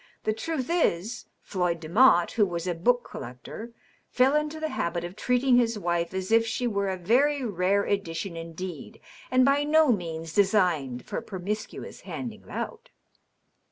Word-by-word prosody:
The 215 - +1
truth 265 +3 -3
is, 240 - 0 0.2
Floyd 175 -3 -1
Demotte, 175 +1 +4
who 220 - +2
was 170 -1 -4
a 180 - 0
book 240 +9 +1
collector, 125 - -8 0.4
fell 260 +3 +3
into 300 +1 -1
the 315 0 -2
habit 170 - -2
of 175 +2 -6
treating 250 +2 +3
his 230 -2 +2
wife 170 -3 -1
as 190 +2 -3
if 230 0 +6
she 230 +2 -2
were 200 -4 0
a 190 - -2
very 265 +9 +2
rare 200 -1 +1
edition 195 -2 -2
indeed 165 +4 -7 0.3
and 255 0 +4
by 280 +1 +3
no 305 -1 +4
means 165 -5 -3
designed 180 - +2
for - - -4
promiscuous 210 +3 -5
handing 230 -4 -6
about." 470 +2 -6
205 Hz, 160 wpm, -27 LUFS, 175-250 Hz, 0.4 s, if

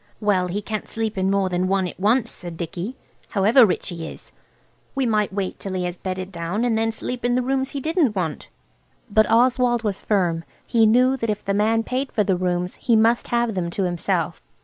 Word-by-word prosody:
"Well, 195 -4 +2
he 200 +4 -3
can't 215 +1 -4
sleep 225 -1 -3
in 190 0 0
more 195 -1 +2
than 180 0 0
one 190 -1 +1
at 175 - -9
once," 225 +4 +2
said 175 -2 -7
Dicky, 175 - -5 0.3
"however 220 +4 +5
rich 190 - -2
he 165 -2 -5
is. - - -11 0.6
We 270 -1 +1
might 215 -3 +1
wait 195 -1 -3
till 195 - -5
he 180 - -1
was 175 0 -4
bedded 185 0 -4
down 175 +6 -2
and 235 -2 +1
then 225 0 +1
sleep 245 +2 -5
in 245 0 +2
the 250 - +1
rooms 265 +1 0
he 280 - -4
didn't 310 - +1
want." 170 -5 -3 0.6
But 215 +1 +4
Oswald 240 +1 +3
was 205 -3 -2
firm. 175 -5 +1 0.2
He 225 -2 +4
knew 255 +4 +4
that 230 -3 -2
if 210 -1 -2
the 200 - 0
man 220 +3 +2
paid 260 +3 -2
for 210 - +2
the 190 -2 +1
rooms 180 0 -1
he 235 - +3
must 225 +2 +3
have 235 -1 +1
them 180 -3 -2
to 195 +3 -2
himself. 175 -2 -1
210 Hz, 215 wpm, -23 LUFS, 185-235 Hz, 0.6 s, however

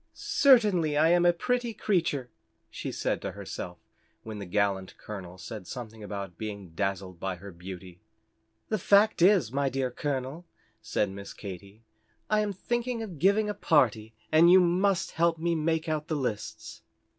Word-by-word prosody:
"Certainly 205 - +4
I 160 +2 +5
am 175 0 +4
a - - +7
pretty 240 +6 -1
creature," 160 - 0 0.4
she - - -5
said - - -1
to - - -4
herself - - -7 0.5
when 110 -2 -7
the 100 - -6
gallant 100 -1 0
Colonel 95 -4 -8
said 105 -1 -8
something 110 -3 -8
about 100 -4 -6
being 100 -4 -6
dazzled 95 +1 -3
by 95 0 -2
her 100 +3 -10
beauty. 90 0 -10 0.7
"The 215 - 0
fact 205 +1 +4
is, 180 - +5
my 140 +1 +1
dear 130 -1 -1
Colonel," 140 +5 -4 0.3
said 105 -2 -1
Miss 100 +1 -8
Katy, 100 +2 -9 0.5
"I 215 - +4
am 210 -1 0
thinking 240 +4 -2
of 180 -9 -8
giving 200 +5 +3
a 210 - -1
party, 115 - +2 0.2
and 165 +2 +7
you 185 +1 +8
must 185 +1 +2
help 170 0 +2
me 170 +1 0
make 160 0 0
out 155 -1 -2
the 160 - -1
lists." 125 -7 -4
140 Hz, 165 wpm, -28 LUFS, -, 0.7 s, you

